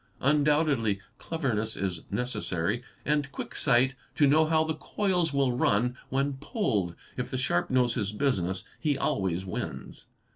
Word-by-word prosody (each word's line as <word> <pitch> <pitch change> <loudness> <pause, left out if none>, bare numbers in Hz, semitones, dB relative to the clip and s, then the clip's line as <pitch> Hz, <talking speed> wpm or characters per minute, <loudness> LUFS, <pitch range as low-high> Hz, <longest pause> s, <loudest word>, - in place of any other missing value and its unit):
Undoubtedly 145 -7 +3 0.2
cleverness 120 -10 -1
is 95 -3 -2
necessary 105 -2 -1 0.2
and 145 -1 +1
quick - - -6
sight 130 0 +3 0.2
to 145 - +5
know 155 +3 +5
how 160 0 +3
the 160 0 -1
coils 180 0 0
will 135 -3 +2
run 125 +1 +2
when 140 +2 +1
pulled; 125 - -1 0.2
if 125 - -2
the 130 - -2
sharp 125 -9 +1
knows 125 -2 +3
his 105 -3 -1
business 100 -6 0 0.2
he 145 -3 +1
always 95 -7 0
wins. 90 - -6
130 Hz, 145 wpm, -28 LUFS, 105-150 Hz, 0.2 s, to